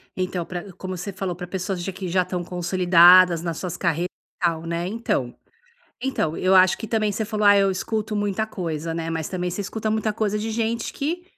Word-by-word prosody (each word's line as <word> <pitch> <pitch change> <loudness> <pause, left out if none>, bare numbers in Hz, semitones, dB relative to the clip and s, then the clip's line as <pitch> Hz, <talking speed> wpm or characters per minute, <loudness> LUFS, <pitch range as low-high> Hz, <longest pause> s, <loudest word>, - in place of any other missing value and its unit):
Então, 185 -2 -2
pra 180 +2 -6
como 185 +1 -6
você 180 +3 -5
falou, 185 -2 -4
pra 180 +1 -7
pessoas 185 0 -3
j 195 - -3
que 185 0 -6
já 185 +2 +2
estão 180 0 -3
consolidadas 180 0 +5
nas 165 -2 -3
suas 180 -3 -4
carreiras 170 0 -1
e - - -74
tal, 165 -1 0
né. 170 +1 -2
Então 190 - -2 0.7
então 250 - -1
eu 185 +1 +2
acho 185 0 +5
que 220 - -5
também 215 -1 0
você 215 +2 -2
falou: 215 0 -2
"Ah, 205 0 +8
eu 195 -1 +4
escuto 215 +3 -3
muita 205 +1 -1
coisa, 165 -5 -4
né". 165 0 -3
Mas 160 -1 -3
também 180 -1 -3
você 175 - -4
escuta 215 +2 -3
muita 220 0 0
coisa 210 -1 -1
de 220 +1 -3
gente 230 +1 -2
que 340 +5 -3
185 Hz, 215 wpm, -23 LUFS, 175-210 Hz, 0.7 s, Ah